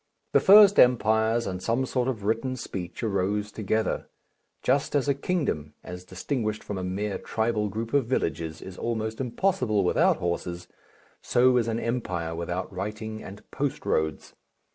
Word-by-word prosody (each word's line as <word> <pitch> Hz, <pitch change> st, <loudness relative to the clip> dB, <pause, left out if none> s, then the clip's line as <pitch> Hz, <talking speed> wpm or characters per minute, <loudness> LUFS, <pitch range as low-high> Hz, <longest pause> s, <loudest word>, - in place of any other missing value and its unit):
The -, -, +5 dB
first 205 Hz, 0 st, +8 dB
empires 110 Hz, -1 st, +4 dB
and 90 Hz, -1 st, -4 dB
some 115 Hz, +6 st, 0 dB
sort 125 Hz, -1 st, -1 dB
of 115 Hz, -6 st, -3 dB
written 115 Hz, +5 st, 0 dB
speech 95 Hz, -5 st, -6 dB
arose 105 Hz, 0 st, 0 dB
together. 110 Hz, +1 st, -1 dB, 0.5 s
Just 140 Hz, +3 st, +1 dB
as 145 Hz, -1 st, +2 dB
a 140 Hz, -, +4 dB
kingdom, 135 Hz, -, -2 dB
as 90 Hz, 0 st, -8 dB
distinguished 110 Hz, +3 st, -3 dB
from 100 Hz, -2 st, -4 dB
a -, -, -4 dB
mere 100 Hz, +3 st, -2 dB
tribal 110 Hz, -2 st, -1 dB
group 110 Hz, +3 st, -5 dB
of 140 Hz, -5 st, +2 dB
villages, 80 Hz, -, -2 dB
is 95 Hz, -1 st, -9 dB
almost 110 Hz, 0 st, -2 dB
impossible 125 Hz, -, +1 dB
without 90 Hz, -, +3 dB
horses, 85 Hz, 0 st, -3 dB, 0.5 s
so 125 Hz, +1 st, +3 dB
is 120 Hz, -2 st, +2 dB
an 115 Hz, 0 st, -1 dB
empire 90 Hz, -10 st, -2 dB
without 85 Hz, +3 st, -4 dB
writing 105 Hz, +3 st, -5 dB
and 100 Hz, +2 st, -10 dB
post 140 Hz, 0 st, -3 dB
roads. 80 Hz, 0 st, -1 dB
110 Hz, 155 wpm, -26 LUFS, 95-125 Hz, 0.5 s, first